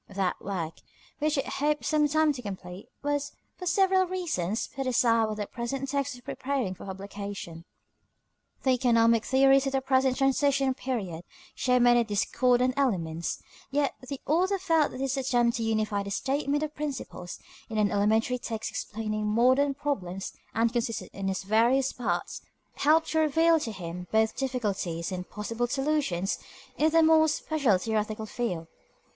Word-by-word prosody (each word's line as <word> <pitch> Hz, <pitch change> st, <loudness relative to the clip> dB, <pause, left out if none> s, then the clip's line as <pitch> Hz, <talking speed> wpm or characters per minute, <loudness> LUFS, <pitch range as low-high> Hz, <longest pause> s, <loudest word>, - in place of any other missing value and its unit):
That 195 Hz, -2 st, -2 dB
work, 175 Hz, -5 st, -4 dB, 0.4 s
which 305 Hz, 0 st, +1 dB
it 275 Hz, -, 0 dB
is -, -, -5 dB
hoped 295 Hz, +1 st, 0 dB
some 300 Hz, -1 st, +3 dB
time 310 Hz, 0 st, +3 dB
to 260 Hz, -, -7 dB
complete, 185 Hz, -3 st, -8 dB, 0.2 s
was, 290 Hz, 0 st, -1 dB, 0.2 s
for 365 Hz, -, -6 dB
several 380 Hz, 0 st, +3 dB
reasons, 305 Hz, -, -2 dB
put 270 Hz, -1 st, -2 dB
aside 230 Hz, -2 st, +3 dB
while 215 Hz, 0 st, -3 dB
the 210 Hz, -1 st, -3 dB
present 255 Hz, +5 st, -4 dB
text 280 Hz, -1 st, -1 dB
was 245 Hz, -, -13 dB
preparing 260 Hz, -7 st, -2 dB
for 185 Hz, -, -11 dB
publication. 195 Hz, -3 st, -7 dB, 1.0 s
The 265 Hz, -, +3 dB
economic 230 Hz, -3 st, +4 dB
theories 270 Hz, +1 st, +4 dB
of 270 Hz, -, -2 dB
the 270 Hz, -, +1 dB
present 260 Hz, -1 st, +2 dB
transition 270 Hz, 0 st, +2 dB
period 200 Hz, -11 st, -4 dB, 0.3 s
show 250 Hz, -1 st, +2 dB
many 240 Hz, -1 st, +5 dB
discordant 245 Hz, +4 st, +2 dB
elements, 170 Hz, -11 st, -1 dB, 0.3 s
yet 280 Hz, 0 st, +1 dB, 0.2 s
the 275 Hz, -2 st, -4 dB
author 370 Hz, +6 st, +2 dB
felt 325 Hz, -5 st, +2 dB
that 255 Hz, -, -8 dB
his 270 Hz, 0 st, -1 dB
attempt 245 Hz, -3 st, +2 dB
to 230 Hz, -, -2 dB
unify 215 Hz, -2 st, 0 dB
the 200 Hz, -, -5 dB
statement 280 Hz, +7 st, 0 dB
of 305 Hz, 0 st, -4 dB
principles, 270 Hz, -12 st, -5 dB, 0.3 s
in 220 Hz, -, -4 dB
an 210 Hz, -1 st, +2 dB
elementary 220 Hz, +5 st, +2 dB
text 225 Hz, -2 st, -4 dB
explaining 215 Hz, -1 st, -3 dB
modern 260 Hz, +6 st, +3 dB
problems, 195 Hz, -11 st, -3 dB, 0.2 s
and 230 Hz, +1 st, +2 dB
consistent 230 Hz, -2 st, -2 dB
in 195 Hz, 0 st, -3 dB
its 190 Hz, 0 st, -2 dB
various 235 Hz, +6 st, +3 dB
parts, 185 Hz, -8 st, -3 dB, 0.4 s
helped 315 Hz, +2 st, +3 dB
to 320 Hz, -, +2 dB
reveal 325 Hz, +2 st, +4 dB
to 230 Hz, -, -4 dB
him 180 Hz, -2 st, -7 dB
both 220 Hz, 0 st, +2 dB
difficulties 200 Hz, -10 st, -2 dB
and 180 Hz, -1 st, -5 dB
possible 230 Hz, +3 st, -3 dB
solutions 270 Hz, -, 0 dB, 0.4 s
in 310 Hz, +4 st, +3 dB
the 325 Hz, 0 st, +4 dB
more 315 Hz, 0 st, +6 dB
special 295 Hz, -, +1 dB
theoretical 215 Hz, +2 st, -2 dB
field. 205 Hz, -8 st, -3 dB
245 Hz, 160 wpm, -28 LUFS, 205-280 Hz, 1.0 s, more